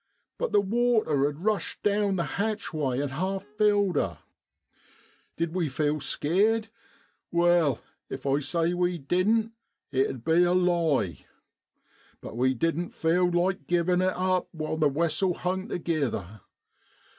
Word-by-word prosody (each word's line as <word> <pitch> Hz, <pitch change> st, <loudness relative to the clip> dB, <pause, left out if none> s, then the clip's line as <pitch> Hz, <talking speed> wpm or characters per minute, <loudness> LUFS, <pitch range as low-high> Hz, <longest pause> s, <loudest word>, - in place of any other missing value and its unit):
But -, -, -1 dB
the 205 Hz, -, +4 dB
water 215 Hz, -, +2 dB
had 150 Hz, +4 st, -6 dB
rushed 215 Hz, -2 st, -1 dB
down 205 Hz, -1 st, +2 dB
the 170 Hz, -, 0 dB, 0.2 s
hatchway 155 Hz, -, -2 dB
an' 145 Hz, 0 st, -1 dB
half 185 Hz, +7 st, -2 dB
filled 205 Hz, -2 st, +1 dB
her. 85 Hz, -6 st, -1 dB, 1.2 s
Did 165 Hz, 0 st, -2 dB
we 175 Hz, -5 st, 0 dB
feel 150 Hz, +3 st, 0 dB
skeered? 210 Hz, +11 st, +1 dB, 0.6 s
Wai, 170 Hz, -6 st, +3 dB, 0.3 s
if 130 Hz, -, -7 dB
I 140 Hz, +1 st, +2 dB
say 165 Hz, +4 st, 0 dB
we 180 Hz, 0 st, 0 dB
didn't, 200 Hz, +9 st, +1 dB, 0.4 s
it 135 Hz, -1 st, +2 dB
'ud 125 Hz, -4 st, -7 dB
be 165 Hz, +5 st, +3 dB
a 175 Hz, 0 st, +3 dB
lie, 165 Hz, -, +1 dB, 1.0 s
but -, -, -9 dB
we 130 Hz, +2 st, +2 dB
didn't 165 Hz, +6 st, -1 dB
feel 175 Hz, +2 st, +2 dB
like 180 Hz, +2 st, 0 dB
givin' 175 Hz, +1 st, +2 dB
it 185 Hz, 0 st, +1 dB
up 185 Hz, 0 st, 0 dB
while 155 Hz, -1 st, -3 dB
the 155 Hz, -2 st, +3 dB
wessel 170 Hz, +5 st, 0 dB
hung 185 Hz, +2 st, -2 dB
togither. 125 Hz, -, -2 dB
175 Hz, 140 wpm, -27 LUFS, 145-190 Hz, 1.2 s, the